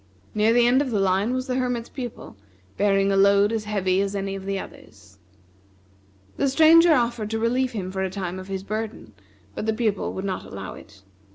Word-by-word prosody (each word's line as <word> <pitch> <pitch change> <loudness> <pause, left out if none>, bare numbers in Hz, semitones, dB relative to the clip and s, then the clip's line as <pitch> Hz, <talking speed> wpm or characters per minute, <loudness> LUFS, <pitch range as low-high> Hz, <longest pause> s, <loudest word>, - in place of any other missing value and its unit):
Near 215 +1 +3
the 240 0 +4
end 250 +3 +4
of 285 - -2
the 215 -4 0
line 195 +4 +1
was 255 0 -2
the 255 -2 -2
Hermit's 245 -2 -2
Pupil, 245 - -8 0.4
bearing 195 -1 +2
a - - +2
load 200 +1 +4
as 220 -2 -2
heavy 190 -3 0
as 200 0 -2
any 195 0 -3
of 195 -1 -7
the 195 0 -2
others. 95 - -12 1.2
The 275 - +1
Stranger 325 +4 +6
offered 235 -3 -1
to 225 - -2
relieve 245 +3 0
him 185 -4 -4
for 190 0 -3
a 190 - -1
time 185 -1 -5
of 185 - -9
his 190 -1 -4
burden, 215 - -5 0.4
but 215 - -5
the 220 - +2
Pupil 215 -4 -1
would 190 - -5
not 190 -2 -3
allow 95 -1 -8
it. 100 -2 -15
205 Hz, 205 wpm, -24 LUFS, 190-240 Hz, 1.2 s, Stranger